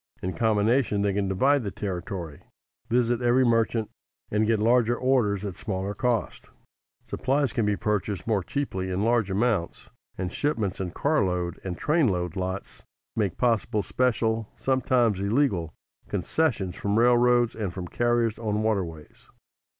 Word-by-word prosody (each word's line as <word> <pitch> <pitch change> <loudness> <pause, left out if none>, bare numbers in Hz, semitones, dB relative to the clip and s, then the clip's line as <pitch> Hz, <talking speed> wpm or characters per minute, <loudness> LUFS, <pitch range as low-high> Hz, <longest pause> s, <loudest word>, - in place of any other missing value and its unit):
In 95 0 -2
combination 110 -1 +2
they 100 -1 +1
can 100 0 0
divide 130 +9 +2
the 100 - -2
territory, 90 -5 -5 0.5
visit 120 0 +2
every 125 +2 +3
merchant 115 -1 +1 0.4
and 105 +1 +2
get 115 -1 +2
larger 120 +1 +3
orders 110 -7 +1
at 95 -3 -5
smaller 95 -2 -3
cost. 120 +1 -1 0.6
Supplies 135 0 0
can 115 -3 0
be 105 - +2
purchased 105 -3 -2
more 110 -4 +1
cheaply 95 -7 -3
in 95 +2 -1
large 115 -3 +2
amounts, 100 -3 -1 0.3
and 90 0 -3
shipments 110 -10 -1
in 95 -2 -2
car 140 - +1
load 90 -2 -2
and 90 -2 -4
train 155 -2 +2
load 90 -4 -1
lots 95 +1 -4 0.3
make 100 -5 -1
possible 115 -3 +1
special 115 -2 0
(sometimes 125 -5 +1
illegal) 100 - +1 0.4
concessions 110 - -1
from 100 +1 -1
railroads 120 0 +4
and 105 -5 -3
from 90 0 -6
carriers 120 +1 0
on 110 -1 -1
waterways. 90 -8 -3
110 Hz, 145 wpm, -26 LUFS, 95-120 Hz, 0.6 s, railroads